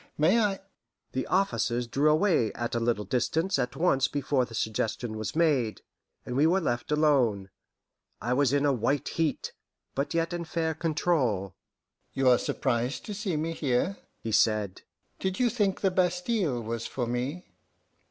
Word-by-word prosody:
May 170 +10 +4
I 205 -3 +1 0.3
" - - -54
The 130 - -2
officers 180 -11 +1
drew 140 +6 +2
away 155 - +3
at 120 0 -4
a 120 - +1
little 115 -3 0
distance 160 - 0
at 125 +2 -2
once 135 -4 +2
before 140 -2 0
the 115 -2 -10
suggestion 110 +1 -2
was 110 +5 -4
made, 145 -10 +1 0.4
and 125 - -4
we 145 +4 +4
were 180 +4 +3
left 120 -6 -2
alone. 130 -11 +2 0.7
I 120 - -1
was 135 -1 +3
in 145 0 +2
a 140 - +3
white 130 +4 0
heat, 160 -3 -1 0.4
but 140 +4 -2
yet 165 +1 0
in 175 0 -3
fair 160 0 -1
control. 145 - 0 0.6
"You 135 -1 +3
are 125 - +5
surprised 125 0 -1
to 210 - -5
see 195 -5 -2
me 160 +2 -1
here," 145 +6 0 0.3
he 115 - -3
said. 105 -3 +2 0.4
"Did 190 0 -2
you 245 -2 +3
think 205 -5 0
the 195 - +2
Bastile 180 - 0
was 115 +1 -4
for 125 - -3
me? 125 +9 -3
140 Hz, 170 wpm, -28 LUFS, 120-170 Hz, 0.7 s, are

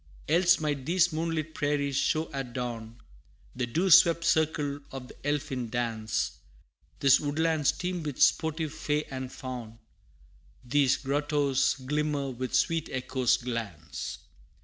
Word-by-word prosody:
Else 175 +3 +4
might 145 -3 -2
these 175 0 +3
moonlit 160 -1 -2
prairies 145 -2 -1
show 155 +4 0
at 135 -3 -4
dawn, 120 -2 -5 0.6
The 125 -1 -2
dew 175 +10 0
swept 170 -2 +7
circle 150 -3 +1
of 130 -2 -8
the - - -12
elfin 135 -5 -2
dance 115 -2 -2 0.6
These 135 -2 +6
woodlands 155 0 +1
teem 180 -1 -3
with 145 -4 -5
sportive 160 -1 +2
fay 150 -1 -1
and 130 -1 -5
faun 120 -4 -7 0.9
These 135 +1 +3
grottoes 145 -1 +1
glimmer 145 0 -2
with 130 +1 -3
sweet 165 -2 +1
Echo's 130 -1 +1
glance. 115 -9 -5
145 Hz, 125 wpm, -28 LUFS, 125-155 Hz, 0.9 s, swept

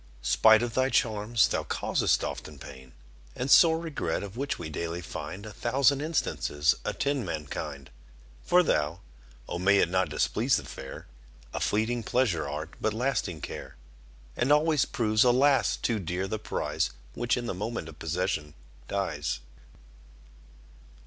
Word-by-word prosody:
Spite 110 - +5
of 120 -1 -3
thy 130 +2 +2
charms, 110 -2 +2
thou - - 0
causest - - 0
often 75 -2 -5
pain 65 -1 -12 0.4
And 130 +2 -2
sore 160 +2 +7
regret, 155 - -3
of 100 +1 -8
which 140 +3 -2
we 85 - -6
daily 85 +2 -4
find 90 +3 -7
A 105 - -8
thousand 135 +4 +2
instances 110 - +1
attend 140 -2 -1
mankind: 75 -5 -5 0.5
For 180 +1 +4
thou 75 - 0 0.5
O 85 - -4
may 100 +2 +4
it 85 - +3
not 95 -2 +1
displease 75 - +1
the - - -6
fair 65 0 -9 0.5
A - - -2
fleeting 110 +3 0
pleasure 105 - 0
art, 75 +4 -5
but 110 -1 0
lasting 115 - -1
care. - - -7 0.6
And 130 - +1
always 150 -1 +4
proves, 110 -2 +2
alas! 130 +2 +4
too 115 -3 -1
dear 90 +1 -2
the 110 +2 -3
prize, - - -1 0.2
Which, 120 0 0
in 120 - -3
the 115 - -2
moment 105 -1 -4
of 80 -2 -12
possession, 80 -3 -2 0.3
dies. 80 -7 -2
105 Hz, 150 wpm, -28 LUFS, 80-125 Hz, 0.6 s, sore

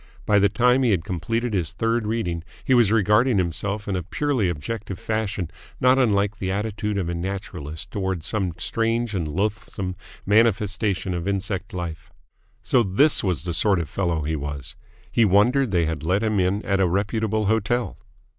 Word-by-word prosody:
By 105 -1 +4
the 100 0 +4
time 125 +4 +3
he 125 - +3
had 95 -6 +2
completed 115 +8 -2
his 90 -6 -1
third 115 -1 0
reading 90 -7 -2 0.2
he 130 - +2
was 120 -5 +5
regarding 110 +2 +3
himself 100 +5 -2
in 100 - -1
a 90 - -1
purely 120 - 0
objective 95 +5 -4
fashion 105 -5 -2 0.3
not 130 +1 +4
unlike 105 -3 +2
the 95 - -2
attitude 105 +1 -2
of 95 -4 -1
a 85 - -2
naturalist 85 -4 -5
towards 95 -5 -2
some 95 -6 0
strange 115 0 -1
and 85 -5 -1
loathesome 95 +1 -3 0.3
manifestation 105 -3 +2
of 85 +1 -3
insect 100 +1 -2
life. 85 -4 -6 0.5
So 125 - +3
this 115 +9 +3
was 90 -8 0
the 85 -1 -3
sort 95 +3 +3
of 85 -3 -2
fellow 85 -4 -1
he 80 +2 -1
was! 70 -4 -5 0.4
He 115 - +3
wondered 115 +7 +4
they 85 -4 +2
had 80 -2 -3
let 95 +7 +1
him 110 -2 +1
in 95 +3 0
at 100 -1 +1
a 95 - +4
reputable 105 +3 0
hotel. 110 +3 0
100 Hz, 175 wpm, -23 LUFS, 90-110 Hz, 0.5 s, was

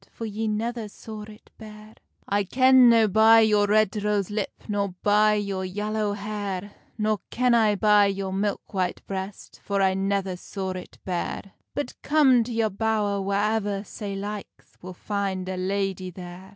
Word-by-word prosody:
For 230 - -7
ye 220 +1 -3
never 225 +1 -2
saw 215 +1 -9
it 215 0 -15
bare?" 215 0 -12 0.3
"I 205 0 +1
ken 255 +4 +6
no 225 -2 +5
by 220 +3 +6
your 210 -2 +3
red 215 -1 +3
rose 205 -2 0
lip, 210 - -4
Nor 200 -3 -2
by 210 +1 +4
your 200 -2 -2
yallow 210 +2 -2
hair; 205 -1 -4 0.3
Nor 215 -1 0
ken 250 0 +2
I 220 -3 +4
by 210 0 +5
your 195 -1 -3
milk 200 +2 -2
white 185 -2 -2
breast, 190 0 -7
For 200 -1 -1
I 190 -1 +3
never 195 -1 -1
saw 190 +1 -5
it 185 -1 -8
bare; 185 +2 -4 0.2
But, 290 -3 -5
come 270 -6 +4
to 245 - -6
your 225 -2 0
bowr 205 -1 0
whaever 205 0 0
sae 200 -1 -6
likes, 205 +1 -7
Will 185 0 -9
find 195 -2 -3
a 190 - -3
ladye 190 0 -2
there." 180 +1 -10
205 Hz, 165 wpm, -25 LUFS, 195-215 Hz, 0.3 s, ken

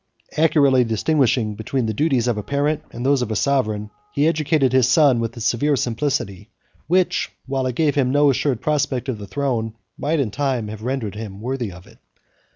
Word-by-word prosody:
Accurately 145 -5 +4
distinguishing 115 -1 +1
between 115 +4 -2
the 110 - -1
duties 130 -1 +1
of 120 - +1
a 105 - -3
parent 145 +5 -1
and 120 +2 -6
those 140 -1 +3
of 120 - -2
a 110 - -2
sovereign, 105 -5 0 0.2
he 150 -4 +2
educated 155 -4 +1
his 130 -2 +4
son 135 -3 +5
with 115 +1 -3
a - - -5
severe 120 +6 +1
simplicity, 120 -6 -2 0.4
which, 180 +2 +1 0.2
while 135 -1 -1
it 125 - -3
gave 155 -1 +2
him 135 -3 +1
no 145 +1 +4
assured 130 -2 -1
prospect 140 -4 -1
of 115 -5 -3
the 100 - -8
throne, 115 -4 -2 0.2
might 155 +2 0
in 125 -7 0
time 130 -4 -1
have 110 0 -8
rendered 125 -3 -3
him 105 -2 -7
worthy 120 -2 -3
of 90 0 -13
it. - - -19
130 Hz, 195 wpm, -21 LUFS, 110-145 Hz, 0.4 s, son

